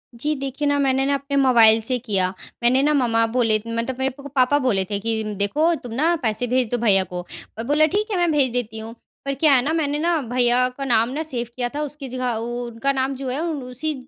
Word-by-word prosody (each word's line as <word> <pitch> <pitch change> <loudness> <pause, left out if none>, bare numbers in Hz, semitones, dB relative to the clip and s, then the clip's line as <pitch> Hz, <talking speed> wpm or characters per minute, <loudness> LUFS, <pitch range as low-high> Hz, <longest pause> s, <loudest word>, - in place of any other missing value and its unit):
जी। 295 +6 -1
देखिए 275 +2 -3
ना, 285 0 +2
मैंने 270 -1 +2
ना, 280 - +1
अपने 280 +1 -4
मोबाइल 230 -5 +5
से 250 +3 +1
किया, 195 -6 -1 0.3
मैंने 255 +3 +4
ना 300 +1 +3
मम्मा 230 -4 +2
बोले 225 -2 +2
मतलब 230 +3 -3
मेरे 265 +1 0
को 285 - -8
पापा 265 +1 +2
बोले 210 -8 +1
थे, 200 - -1
कि 225 +1 -1
देखो 300 +12 +2
तुम 240 -2 -7
ना 325 +7 +2
पैसे 225 +2 0
भेज 250 -1 +1
दो 245 - +1
भैया 200 -5 +3
को 180 -1 -7
और - - -15 0.3
मैं 230 - -4
बोला 300 +2 +4
ठीक 425 +2 -1
है 395 - 0
मैं 345 -2 +2
भेज 275 -4 +2
देती 225 -3 -3
हूँ। 225 +1 -8 0.3
पर 275 - -1
क्या 290 +1 +4
है 255 - +5
ना, 295 +5 -1
मैंने 295 -3 0
ना, 335 0 +1
भैया 245 0 +2
का 275 - -4
नाम 230 -2 +2
ना 310 +3 -2
सेव 245 -6 -4
किया 245 -1 -2
था। 295 - -2
उसकी 295 -1 -7
जगह 250 -1 -2
उ 225 +1 -4
उ 240 0 -4
उनका 235 +4 -1
नाम 270 0 -1
जो 265 0 -5
है, 260 +3 -2
उसी 300 -2 -3
255 Hz, 250 wpm, -22 LUFS, 230-285 Hz, 0.3 s, मोबाइल